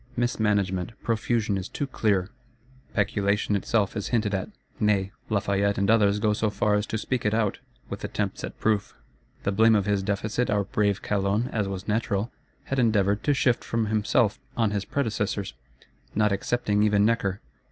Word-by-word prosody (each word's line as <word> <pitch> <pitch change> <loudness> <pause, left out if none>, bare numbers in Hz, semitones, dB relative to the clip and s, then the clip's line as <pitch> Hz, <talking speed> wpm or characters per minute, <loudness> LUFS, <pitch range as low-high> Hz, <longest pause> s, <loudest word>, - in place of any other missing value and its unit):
Mismanagement, 105 -5 0
profusion 110 -2 0
is 95 - -6
too 145 - -3
clear. 105 -7 0 0.6
Peculation 105 0 +1
itself 100 +1 0
is 100 - -3
hinted 110 -4 0
at; 95 -1 -2 0.3
nay, 100 -2 +2 0.2
Lafayette 100 -1 +1
and 100 +2 +2
others 105 -2 +4
go 105 0 +2
so 110 +1 0
far 105 0 +1
as 105 0 +1
to 110 - -2
speak 125 +2 -2
it 105 +1 +1
out, 110 -3 0 0.3
with - - -7
attempts - - -3
at - - -7
proof. 105 -2 0 0.5
The 100 - +1
blame 110 +3 +5
of 100 -2 +2
his 100 -1 +1
Deficit 105 +5 -1
our 105 -1 +2
brave 100 +1 0
Calonne, 105 +4 0
as 105 -3 -1
was 95 -1 -5
natural, 105 0 0 0.3
had 135 - -2
endeavoured 105 -4 +2
to 145 - +3
shift 125 -2 +2
from 115 -1 -1
himself 105 0 +1 0.2
on 110 -3 +2
his 100 -1 -2
predecessors; 105 - -2 0.6
not 105 -1 +3
excepting 105 +1 0
even 105 -1 +4
Necker. 105 -4 +1
105 Hz, 170 wpm, -26 LUFS, 100-110 Hz, 0.6 s, blame